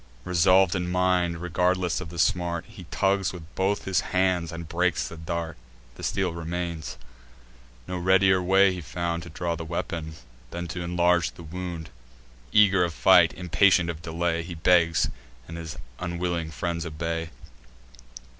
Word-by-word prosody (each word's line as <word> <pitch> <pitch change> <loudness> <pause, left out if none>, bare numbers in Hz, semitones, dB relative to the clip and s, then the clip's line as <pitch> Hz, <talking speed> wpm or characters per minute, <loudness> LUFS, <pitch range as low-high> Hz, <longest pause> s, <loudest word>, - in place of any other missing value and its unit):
Resolv'd 90 +1 +4
in 90 -2 -2
mind, 90 -2 +1
regardless 90 +1 0
of 85 - -7
the 85 - -9
smart, 85 0 0
He 105 -5 -12
tugs 95 0 +1
with 90 -3 -8
both 95 +2 0
his 95 -1 +2
hands, 90 -3 0
and 85 -1 -7
breaks 90 0 0
the - - -8
dart. 85 0 -4 0.4
The - - -12
steel 95 -3 -1
remains. 85 -1 -4 0.9
No 90 -1 -3
readier 95 +1 +4
way 95 +1 +4
he 90 - -6
found 85 +1 -3
To 85 - -9
draw 85 +1 -2
the 85 - -6
weapon, 80 -1 -4 0.3
than 85 +4 -5
t' 90 +1 -5
inlarge 85 -1 +2
the 85 - -12
wound. 85 -2 -6 0.6
Eager 100 -1 +5
of 85 -2 -2
fight, - - +6
impatient 90 0 +3
of 80 -1 -10
delay, 85 0 -1
He 85 +1 -7
begs; 85 0 +3 0.4
and 85 - -8
his 80 -2 -7 0.2
unwilling 85 -2 -2
friends 85 +2 -3
obey. 80 +1 -3
85 Hz, 155 wpm, -26 LUFS, 85-90 Hz, 0.9 s, fight